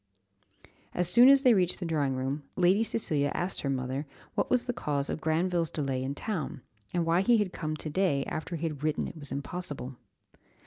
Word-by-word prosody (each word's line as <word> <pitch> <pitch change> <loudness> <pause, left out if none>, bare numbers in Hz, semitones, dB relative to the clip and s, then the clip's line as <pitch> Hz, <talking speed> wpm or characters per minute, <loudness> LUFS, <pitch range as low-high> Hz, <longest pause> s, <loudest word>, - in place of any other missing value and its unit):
As 180 -1 +1
soon 240 +8 +7
as 275 0 +6
they 250 -3 +7
reached 180 -4 +3
the 180 - -4
drawing 145 -5 0
room, 135 +3 -2
Lady 185 +4 +4
Cecilia 150 -11 +1
asked 175 +1 -2
her 140 - -2
mother 135 +2 -2 0.3
what - - 0
was 250 -1 +2
the 245 - -2
cause 145 -9 -2
of - - -4
Granville's 170 +1 +1
delay 135 -5 -2
in 135 +2 -3
town, 160 - -4 0.3
and 175 -2 0
why 165 +2 +3
he 235 +4 +4
had 205 -4 -1
come 155 -2 -3
to 155 - -6
day, 150 -6 +1
after 160 +2 -4
he 165 - -6
had 150 -4 -4
written 155 -1 0
it - - -9
was 145 -2 -6
impossible? 140 -3 -5
160 Hz, 200 wpm, -29 LUFS, 140-185 Hz, 0.3 s, soon